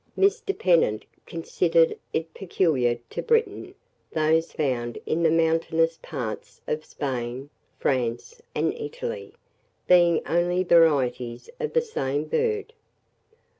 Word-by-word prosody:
Mr. 400 +1 +1
Pennant 165 - +2 0.2
considered 165 0 +2 0.2
it 160 0 -3
peculiar 150 -10 +1
to - - -3
Britain, 460 0 0 0.4
those 160 +1 +2
found 120 -5 -2
in 165 - 0
the 165 - +4
mountainous 165 0 +2
parts 110 -4 -6
of 155 0 -2
Spain, 130 0 -4 0.3
France, 130 - -2
and - - +1
Italy, 470 -1 -6 0.5
being 175 -2 +5
only 175 +2 +1
varieties 135 -8 +2
of 460 - -3
the 480 - +4
same 145 - -2
bird. 435 - -1
165 Hz, 110 wpm, -25 LUFS, 135-200 Hz, 0.5 s, being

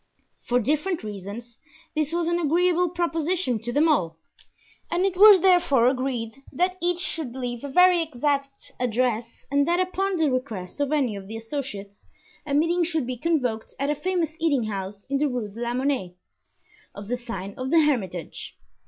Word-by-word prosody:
For 245 0 +1
different 305 - -1
reasons 210 +3 -8 0.4
this 305 -1 0
was 340 0 0
an 345 0 +1
agreeable 350 +2 +2
proposition 335 -5 -1
to 240 +3 -4
them 295 +6 +3
all, 170 - +1 0.7
and 350 +3 +1
it 385 -2 0
was 405 -1 +8
therefore 350 -10 +4
agreed 255 -1 -1
that 365 +2 0
each 350 0 +1
should 310 -9 -1
leave 245 -2 -4
a 285 - -4
very 360 +4 +5
exact 280 -2 -2
address 240 -1 -1
and 285 0 +2
that 345 +1 +2
upon 380 +1 0
the 315 -4 +2
request 230 -6 -4
of 285 0 0
any 265 -8 +1
of 195 -1 -8
the 220 +2 -6
associates 225 -5 -6 0.4
a 280 - 0
meeting 335 +4 +2
should 320 -5 0
be 255 +1 -3
convoked 250 -6 -1
at 280 +2 0
a - - 0
famous 345 0 -1
eating 295 -6 +2
house 200 -1 -5
in 275 0 0
the 300 - +2
Rue 245 -5 -3
de 220 +4 -10
la 240 0 -1
Monnaie, 255 -9 -1 0.8
of 200 0 -8
the 245 - -1
sign 230 -5 -6
of 255 0 -4
the 330 +2 +5
Hermitage. 200 - -2
275 Hz, 180 wpm, -25 LUFS, 235-335 Hz, 0.8 s, was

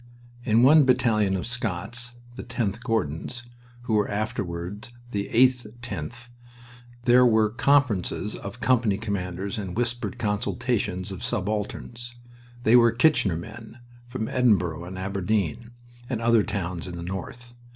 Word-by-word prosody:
In 115 -1 +3
one 150 +3 +7
battalion 115 -6 +2
of 95 - -3
Scots 115 +1 -2 0.2
the - - -7
10th 110 -2 -2
Gordons, 115 - -2 0.4
who 120 - -2
were 105 -1 +2
afterward 100 -2 -4 0.2
the 100 -2 -2
8/10th 120 0 0 0.7
there 125 +1 +6
were 110 -3 +4
conferences 120 -6 +1
of 100 +5 -8
company 120 -6 +2
commanders 100 0 -3
and 95 -1 -5
whispered 120 0 -2
consultations 105 -2 -1
of 95 - -7
subalterns. 110 +4 -3 0.5
They 115 +1 +5
were 120 -1 +7
"Kitchener" 115 - +3
men, 110 +6 -10 0.3
from 120 -2 -4
Edinburgh 90 -10 +1
and 95 +1 -7
Aberdeen 100 +2 -1 0.4
and 125 -4 -1
other 115 -1 +4
towns 90 -4 -4
in 90 - -6
the 85 - -6
North. 95 +7 -7
110 Hz, 130 wpm, -25 LUFS, 95-120 Hz, 0.7 s, one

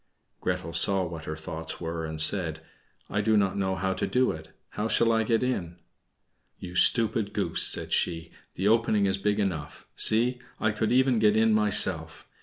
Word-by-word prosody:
Gretel 85 - -3
saw 95 +2 +2
what 80 -2 -8
her 80 - -5
thoughts 80 0 -7
were 80 -1 -4
and 80 0 -6
said, 80 -1 +1 0.5
"I 105 - -2
do 110 +1 +2
not 100 -2 +1
know 95 -1 -1
how 95 +1 -2
to - - -3
do 125 0 +1
it; 80 0 -9 0.2
how 105 - -3
shall 115 0 +2
I 115 0 +2
get 115 +2 0
in?" 90 -9 -3 0.8
"You 90 -1 -9
stupid 110 +2 +2
goose," - - -2
said - - +1
she, 85 -1 -1 0.2
"the 95 - -1
opening 110 -2 +2
is 95 0 0
big 105 +1 0
enough. 80 -8 -4
See, 120 +3 +3 0.2
I 110 - +1
could 110 0 -2
even 130 -1 +3
get 105 0 +3
in 110 0 +3
myself!" 105 -2 +1
100 Hz, 185 wpm, -26 LUFS, 85-110 Hz, 0.8 s, See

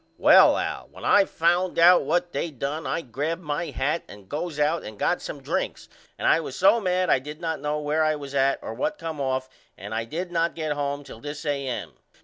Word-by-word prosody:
Well - - +7
Al - - -3
when - - -10
I 200 -1 +5
found 175 +2 +1
out 175 +2 +7
what 175 0 0
they 170 - -2
done 145 +2 -4
I - - -1
grabbed 155 +7 -3
my 150 +2 -2
hat 150 +5 -1
and 100 -2 -13
goes 155 - -4
out 155 +3 +1
and 105 -1 -9
got - - 0
some - - -7
drinks - - -3 0.3
and - - -1
I - - +5
was 145 -5 -6
so 210 +5 +4
mad 185 -1 +1
I - - +4
did 150 +3 -9
not 160 -3 -3
know 150 +1 -1
where 150 +1 +1
I 155 0 +2
was 140 -2 -8
at 135 0 +2
or - - -5
what 205 - -2
come 160 -3 -5
off 130 -1 -1 0.3
and 100 +3 -7
I 115 +1 -2
did 175 +9 -5
not 170 0 0
get 155 -2 -2
home 145 0 -3
till 115 - -11
this 145 +4 -7
A.M. 140 -4 -2
150 Hz, 225 wpm, -25 LUFS, 140-170 Hz, 0.3 s, Well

